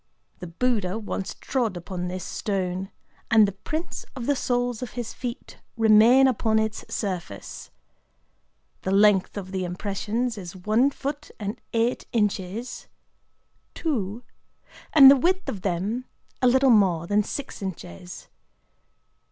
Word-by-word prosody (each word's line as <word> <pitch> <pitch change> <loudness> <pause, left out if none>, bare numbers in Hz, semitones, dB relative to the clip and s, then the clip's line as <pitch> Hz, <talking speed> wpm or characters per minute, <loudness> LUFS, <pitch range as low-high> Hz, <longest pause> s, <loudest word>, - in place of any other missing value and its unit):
The 180 - -7
Buddha 205 +1 0
once 205 -3 -4
trod 230 -8 -2
upon 180 0 -5
this 185 +1 -5
stone; 190 -2 -3 0.4
and 220 -2 +6
the - - -2
prints 310 - -5
of 245 -3 -5
the 285 - +2
soles 245 -2 -1
of 250 - -6
his 240 -2 -5
feet 245 -2 -7 0.2
remain 225 +4 +6
upon 220 -3 +1
its 220 -1 -1
surface. 180 - -5 1.1
The - - -3
length 200 0 +4
of 190 -2 -6
the 190 -1 -2
impressions 205 +5 -2
is 180 -1 -8
one 215 +8 +2
foot 285 +2 -5
and 205 0 -5
eight 230 +2 0
inches, 210 +1 -2 1.0
and 230 - -1 0.9
the - - +7
width 370 +7 +1
of 195 - -4
them 200 +7 -2 0.4
a 255 - +4
little 260 +1 +5
more 185 -7 +3
than 205 +4 +2
six 270 +5 -6
inches. 90 - -7
210 Hz, 130 wpm, -25 LUFS, 190-245 Hz, 1.1 s, the